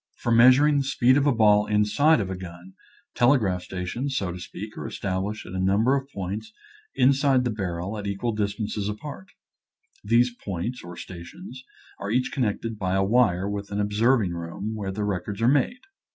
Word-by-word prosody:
For 120 - -2
measuring 130 +5 +6
the - - 0
speed 130 -1 +3
of 145 +1 +2
a - - +5
ball 105 -3 +4
inside 105 +9 +3
of 95 -1 -4
a - - -3
gun, 90 0 -10 0.4
telegraph 115 -8 +2
stations, 95 +10 -4
so 95 -3 -1
to 90 - -7
speak, 105 +4 -8
are - - -5
established 100 +2 -3
at - - -9
a 95 - -3
number 100 +8 +3
of 135 0 -3
points 100 +1 -5 0.4
inside 135 0 +3
the 120 - -1
barrel 95 -1 -4
at 100 - -5
equal 100 +4 -2
distances 105 0 -2
apart. 105 -2 -7 0.8
These 120 +3 +3
points, 100 +6 -4
or 85 0 -9
stations, 125 - -10 0.4
are 100 - -4
each 125 +3 0
connected 115 -3 -2
by 95 -2 0
a 95 - +2
wire 100 -4 +2
with 100 0 -4
an 100 - -3
observing 105 0 +2
room, 85 +6 -5
where 100 -3 -4
the 105 +2 -3
records 100 0 -3
are 115 - +2
made. 145 - +2
105 Hz, 180 wpm, -25 LUFS, 95-125 Hz, 0.8 s, measuring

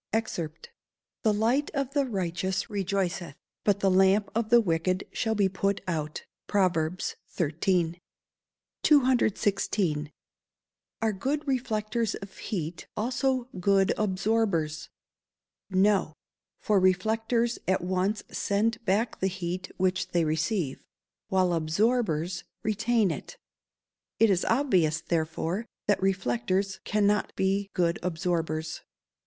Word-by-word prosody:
[Verse: 220 -7 -1 0.7
"The 220 - +3
light 230 +7 +1
of 275 -1 -1
the 285 -2 +2
righteous 190 -1 -2
rejoiceth, 190 -5 -2 0.3
but 205 -1 +2
the 195 - +3
lamp 195 +2 +4
of 225 -1 -1
the 240 0 +7
wicked 185 -2 0
shall 220 -1 -1
be 200 -2 +3
put 195 +1 0
out." 155 -3 -3 0.2
PROVERBS 180 -3 0 0.2
XIII.] 170 +1 0 0.8
216. 205 - +2 0.9
Are 220 -1 +2
good 285 +10 -2
reflectors 230 -4 -1
of 195 -1 -10
heat 170 -4 -5
also 255 +2 0
good 195 +1 +3
absorbers? 195 -6 0 0.8
No; 190 -4 +2 0.4
for 210 -2 +2
reflectors 225 +5 +1
at 185 -1 +1
once 185 +3 0
send 215 +4 0
back 215 +3 0
the 190 - +1
heat 185 0 -4
which 185 0 +1
they 170 -1 +3
receive, 160 - -1 0.4
while 185 -3 +2
absorbers 175 0 0 0.2
retain 220 -1 +2
it. - - -7 0.8
It 225 -2 +5
is 185 -2 +1
obvious, 185 - +2
therefore, 170 +6 -2 0.2
that 205 -1 +2
reflectors 190 +1 0
cannot 210 0 +1
be 195 +1 0
good 170 -2 +1
absorbers. 165 -2 -2
195 Hz, 110 wpm, -28 LUFS, 175-220 Hz, 0.9 s, the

